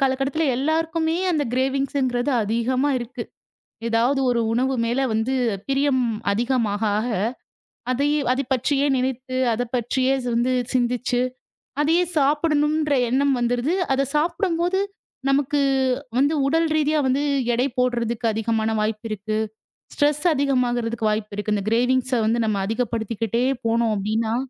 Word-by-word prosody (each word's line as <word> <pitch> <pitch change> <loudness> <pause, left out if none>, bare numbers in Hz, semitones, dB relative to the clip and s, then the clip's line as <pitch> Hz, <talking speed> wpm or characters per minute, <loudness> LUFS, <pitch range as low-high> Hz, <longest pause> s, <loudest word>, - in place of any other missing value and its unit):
காலகட்டத்துல 270 +3 +1
எல்லாருக்குமே 320 +3 0 0.2
அந்த 305 -3 +1
க்ரேவின்ங்ஸ்ங்கிறது 265 0 0
அதிகமா 240 +6 0
இருக்கு. 240 0 -6 0.7
ஏதாவது 240 +4 +2
ஒரு 240 -1 +1
உணவு 260 +3 +1
மேல 240 +3 0
வந்து 225 +4 0 0.3
பிரியம் 275 -1 +2 0.3
அதிகமாக 225 -2 0 0.2
ஆக 230 - -1 0.8
அதை 275 +3 +1 0.2
அதைப் 260 0 -2
பற்றியே 275 +3 +1
நினைத்து 255 0 -3 0.2
அதைப் 245 +2 -4
பற்றியே 255 +2 +1 0.2
வந்து 245 +2 +1 0.2
சிந்திச்சு 245 0 0 0.6
அதையே 325 +4 +3
சாப்பிடனும்ன்ற 300 +1 +2
எண்ணம் 275 +2 +2
வந்துடுது. 245 +7 0 0.2
அதைச் 275 0 0
சாப்பிடும்போது 345 +3 0 0.5
நமக்கு 280 +1 +2 0.6
வந்து 285 +4 +3
உடல் 325 +3 +2
ரீதியா 305 0 +2
வந்து 265 +2 +1 0.3
எடை 245 +3 +1
போடுறதுக்கு 235 -2 0
அதிகமான 220 0 0
வாய்ப்பு 215 +1 -2
இருக்கு. 215 +1 -2 0.6
ஸ்ட்ரெஸ் 295 +2 +1
அதிகமாகுறதுக்கு 245 -5 0
வாய்ப்பு 210 -1 -3
இருக்கு. 210 0 -1
இந்த 200 -2 -2
க்ரேவின்ங்ஸ் 255 +2 +2
வந்து 230 +2 +1
நம்ம 215 - 0
அதிகப்படுத்திக்கிட்டே 230 0 -1 0.2
போனோம் 230 0 +2
அப்டின்னா. 220 +3 -1
255 Hz, 120 wpm, -23 LUFS, 230-280 Hz, 0.8 s, அதையே